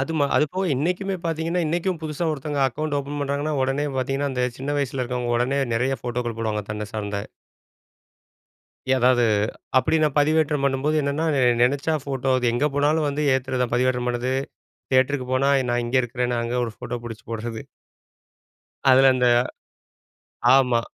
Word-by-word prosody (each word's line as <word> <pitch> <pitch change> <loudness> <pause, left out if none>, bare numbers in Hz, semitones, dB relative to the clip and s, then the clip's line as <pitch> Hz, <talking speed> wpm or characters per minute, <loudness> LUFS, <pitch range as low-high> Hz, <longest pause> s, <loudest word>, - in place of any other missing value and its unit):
அது 135 +4 -2
ம 145 - +3
அது - - +4
போக 190 +1 0
இன்னைக்குமே 180 +7 -1
பார்த்தீங்கன்னா, 165 +2 -1
இன்னைக்கும் 175 +2 -1
புதுசா 155 +2 -3
ஒருத்தங்க 145 0 -4
அக்கவுண்ட் 145 +3 -2
ஓப்பன் 140 +1 -5
பண்றாங்கன்னா, 145 +2 -1
உடனே 135 +3 0
பார்த்தீங்கன்னா, 135 +2 -1
அந்த 125 -1 0
சின்ன 140 +2 -3
வயசில 135 -1 -2
இருக்கிறவங்க, 125 -1 -2
உடனே 130 +3 0 0.2
நெறைய 130 +3 0
ஃபோட்டோக்கள் 120 -1 -3
போடுவாங்க, 110 -2 -1
தன்ன 105 0 -4
சார்ந்த. 105 -1 -3 1.7
எதாவது 125 -1 +4 0.6
அப்படி 155 +5 +2
நான் 150 -3 +1
பதிவேற்றம் 150 -1 +2
பண்ணும்போது 140 +3 0
என்னன்னா, 140 +3 -1
நெ 135 - +2 0.2
நெனச்சா 140 +5 +2
ஃபோட்டோ 135 -2 -2
அது 125 - -1
எங்க 120 +5 +1
போனாலும் 150 +2 +2
வந்து 145 +1 -2
ஏத்தறது 130 -1 -1
தான், 120 - -3
பதிவேற்றம் 125 0 +1
பண்றது. 125 +1 -1 0.6
தியேட்டருக்கு 130 0 +2
போனா, 135 +2 +2 0.2
நான் 120 0 0
இங்க 125 +2 +1
இருக்கிறேன்னு 120 0 -2
அங்க 115 +1 -3
ஒரு 115 - -5
ஃபோட்டோ 120 - -5
பிடிச்சு 115 -1 -8
போடுறது. 115 0 -4 1.3
அதில 135 +1 +7
அந்த 125 -1 +2 1.3
ஆமா. 125 -3 +3
135 Hz, 155 wpm, -23 LUFS, 125-145 Hz, 1.7 s, அதில